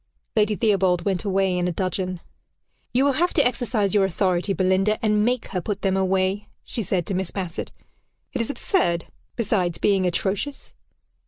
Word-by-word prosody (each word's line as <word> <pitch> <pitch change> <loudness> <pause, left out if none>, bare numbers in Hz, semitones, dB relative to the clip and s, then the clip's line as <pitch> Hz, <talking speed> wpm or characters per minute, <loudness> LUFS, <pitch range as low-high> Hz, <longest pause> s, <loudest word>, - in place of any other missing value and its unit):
Lady 210 -1 +3
Theobald 190 -5 +2
went 195 -1 -1
away 195 -2 +1
in 180 0 0
a - - 0
dudgeon. 185 0 -2 0.7
"You 260 +3 +3
will 285 - +4
have 345 +6 0
to 290 -5 +4
exercise 230 -5 0
your 205 -2 +4
authority, 185 0 +1
Belinda, 190 +2 +2
and 210 -1 +3
make 245 +1 0
her 185 -2 -2
put 205 +2 -4
them 190 -1 +2
away," 190 +1 +1 0.2
she 230 - -4
said 185 -4 -1
to 195 - -3
Miss 185 -1 -1
Bassett. 180 -4 -4 0.6
"It 255 - 0
is 230 - -2
absurd 240 - +1 0.3
besides 190 -7 0
being 195 -3 +2
atrocious." 200 +10 -2
195 Hz, 170 wpm, -24 LUFS, 185-215 Hz, 0.7 s, will